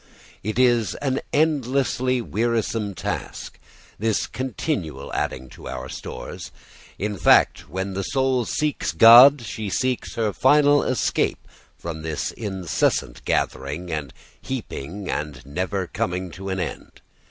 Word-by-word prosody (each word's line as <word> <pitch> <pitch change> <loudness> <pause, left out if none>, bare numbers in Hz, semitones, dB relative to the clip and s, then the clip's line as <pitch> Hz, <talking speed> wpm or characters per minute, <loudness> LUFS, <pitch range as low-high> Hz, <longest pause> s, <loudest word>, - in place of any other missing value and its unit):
It 110 +2 -3
is 120 -4 +3
an 135 -2 -1
endlessly 130 -4 +1
wearisome 110 -2 -1
task, - - -5 0.4
this 110 0 +1
continual 110 - -4
adding 65 0 -2
to - - -11
our - - -6
stores. - - -7 0.5
In 105 +1 -3
fact, 75 - +4
when 95 +4 -3
the 95 - -2
soul 130 +2 +1
seeks 150 - -1
God 120 - +9
she 110 -2 -5
seeks 130 +5 -1
her 110 -3 0
final 145 +1 +5
escape 130 - 0 0.3
from 80 -2 -6
this 80 -1 -3
incessant 95 - -1
gathering 75 +7 -2
and 75 -5 -3 0.3
heaping 100 - -6
and 75 -4 -4
never 95 +6 -2
coming 90 +1 -3
to 95 +4 -7
an 95 0 -2
end. 90 - -6
105 Hz, 125 wpm, -23 LUFS, 85-130 Hz, 0.5 s, God